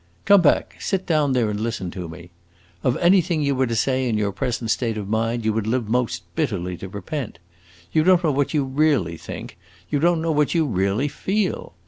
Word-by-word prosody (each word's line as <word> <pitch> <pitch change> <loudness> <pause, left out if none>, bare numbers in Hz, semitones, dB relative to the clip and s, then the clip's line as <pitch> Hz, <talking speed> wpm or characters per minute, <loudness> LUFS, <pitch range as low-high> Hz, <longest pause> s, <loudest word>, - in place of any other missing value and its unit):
"Come 200 -2 +7
back; 160 - +2
sit 190 -2 -2
down 150 -5 +2
there 120 -3 +2
and 105 - -3
listen 110 -5 -3
to 90 -2 -6
me. 85 +1 -11 0.5
Of 125 - +1
anything 175 -3 +3
you 140 -1 +1
were 130 -1 +1
to 115 - -2
say 130 +2 +1
in 110 - 0
your 105 -1 0
present 115 +3 -2
state 115 -2 -1
of 105 -2 -4
mind 115 +2 -1
you 110 - +2
would 110 -1 -2
live 120 -1 0
most 125 +1 -1
bitterly 100 - -1
to 95 - -8
repent. 105 - -5 0.5
You 155 - +3
don't 180 0 +4
know 155 - +3
what 140 0 0
you 150 -3 +1
really 130 - +1
think; 85 - -9 0.3
you 145 - +1
don't 170 +2 +3
know 165 - +1
what 150 +2 +1
you 165 -2 +3
really 100 +2 0
feel. 190 - -2
125 Hz, 210 wpm, -22 LUFS, 105-155 Hz, 0.5 s, Come